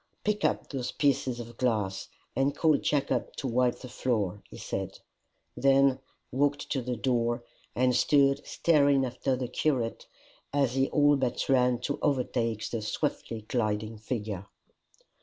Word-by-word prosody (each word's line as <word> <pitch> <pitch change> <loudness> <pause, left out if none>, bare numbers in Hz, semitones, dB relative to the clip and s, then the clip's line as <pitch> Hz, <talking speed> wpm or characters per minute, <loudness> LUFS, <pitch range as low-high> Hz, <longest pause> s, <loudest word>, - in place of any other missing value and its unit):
"Pick 210 0 0
up - - +1
those 130 -3 -3
pieces 135 -4 +1
of 120 0 -9
glass, 105 -6 -1 0.3
and 135 +2 +1
call 155 -2 +4
Jacob 140 -4 0
to - - -5
wipe 125 0 +2
the 130 - -10
floor," 110 -6 -1
he - - -11
said - - -4 0.6
then 135 0 +4 0.3
walked 145 +2 0
to 135 - 0
the 125 0 -3
door, 120 0 0 0.3
and 125 0 +3
stood 140 +1 +4
staring 140 -4 +3
after 130 +1 -1
the 125 -1 -3
curate 125 -5 -1 0.4
as 140 -4 +1
he 135 0 +1
all 145 -1 +4
but 130 -2 -1
ran 125 -2 +3
to 145 +3 -2
overtake 115 -6 0
the 115 - -2
swiftly 110 +1 -3
gliding 110 -1 -2
figure. 105 -4 -4
125 Hz, 145 wpm, -29 LUFS, 115-140 Hz, 0.6 s, call